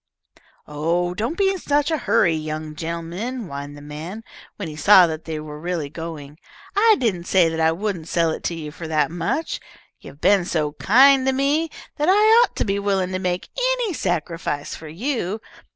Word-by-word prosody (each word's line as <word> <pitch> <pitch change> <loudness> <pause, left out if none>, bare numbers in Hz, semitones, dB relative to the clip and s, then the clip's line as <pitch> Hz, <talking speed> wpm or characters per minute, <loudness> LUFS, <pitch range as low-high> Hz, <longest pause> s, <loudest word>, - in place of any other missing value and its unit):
"Oh, 170 +4 -1
don't 235 - -3
be 390 -1 +3
in 385 - -4
such 290 +1 +1
a 320 - +1
hurry, 220 -7 +3
young 155 0 -4
gen'lemen," 170 +10 -4
whined 145 -2 -7
the 145 - -12
man, 160 +9 -7 0.3
when 200 - -5
he 155 - -7
saw 185 +4 +7
that 160 -1 -5
they 160 -2 -4
were 150 -1 -8
really 165 -4 -3
going. 155 -2 -8 0.4
"I 435 +2 +6
didn't 190 -8 -1
say 180 -3 +4
that 160 0 -4
I 160 0 +4
wouldn't 180 -2 -3
sell 165 -2 +1
it - - -5
to 170 - -1
you 155 -2 -6
for 160 +1 -8
that 155 0 +1
much. 175 - -2 0.4
You've 140 - -13
been 200 +1 +4
so 155 -4 -1
kind 260 - +5
to 265 - +3
me 285 +5 +1 0.3
that 300 +4 +1
I 430 +4 +6
ought - - -3
to - - -1
be 200 -1 0
willing 195 -2 0
to 185 - -2
make 180 -1 -2 0.3
any 470 -6 -2
sacrifice 165 - -2
for 160 - -9
you. 215 - -3
175 Hz, 195 wpm, -22 LUFS, 160-235 Hz, 0.4 s, saw